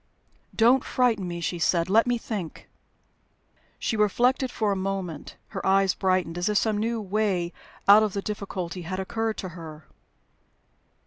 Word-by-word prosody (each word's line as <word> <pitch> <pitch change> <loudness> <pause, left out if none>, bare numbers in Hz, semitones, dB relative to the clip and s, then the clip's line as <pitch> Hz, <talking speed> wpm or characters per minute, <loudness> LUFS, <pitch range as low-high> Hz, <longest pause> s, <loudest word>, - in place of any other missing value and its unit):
"Don't 245 +4 +5
frighten 230 -7 +1
me," 170 -1 -5
she 170 +1 -2
said. 170 0 +2
"Let 220 +5 +4
me 245 0 +2
think." 205 -8 -6 1.1
She - - -2
reflected 245 +5 +2
for 215 -4 -1
a - - +1
moment. 190 -5 -4
Her - - -6
eyes 195 0 +3
brightened, 185 -3 0
as 175 - 0
if 210 - +2
some 215 -1 +1
new 230 +1 -1
way 195 -4 -1 0.3
out 205 +2 +9
of 215 -3 0
the 200 - -2
difficulty 190 -4 -4
had 185 +3 -4
occurred 225 +3 -2
to 185 - -5
her. 160 -3 -10
195 Hz, 155 wpm, -26 LUFS, 180-220 Hz, 1.1 s, out